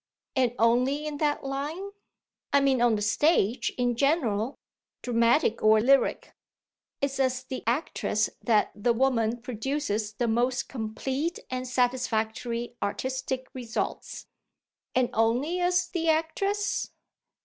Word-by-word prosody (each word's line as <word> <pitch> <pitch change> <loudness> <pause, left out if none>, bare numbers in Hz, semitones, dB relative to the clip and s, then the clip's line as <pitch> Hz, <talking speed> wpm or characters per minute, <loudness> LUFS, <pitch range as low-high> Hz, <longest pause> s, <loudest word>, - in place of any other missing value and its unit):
"And 250 -3 +2
only 250 +6 +2
in 300 -1 -4
that 295 -1 0
line?" 295 +8 -4 0.6
"I 280 - +5
mean 270 -3 +2
on 240 -2 +4
the 210 - -2
stage 240 - +2
in 245 -1 +1
general, 255 -4 +1 0.5
dramatic 235 +1 +2
or 215 0 +6
lyric. 270 +5 +2 0.7
It's 275 -1 -1
as 260 -1 +1
the 260 0 -6
actress 235 -4 0
that 220 -3 +2
the 235 +3 +1
woman 235 -2 +1
produces 230 -3 -2
the 235 +3 -1
most 245 +3 +1
complete 265 +7 -3
and 255 0 -3
satisfactory 240 -1 -1
artistic 260 +4 -2
results." 245 -4 -4 0.7
"And 255 -1 +2
only 245 +10 +1
as 360 0 +2
the 330 -2 -1
actress?" 390 +6 0
255 Hz, 120 wpm, -27 LUFS, 230-280 Hz, 0.7 s, or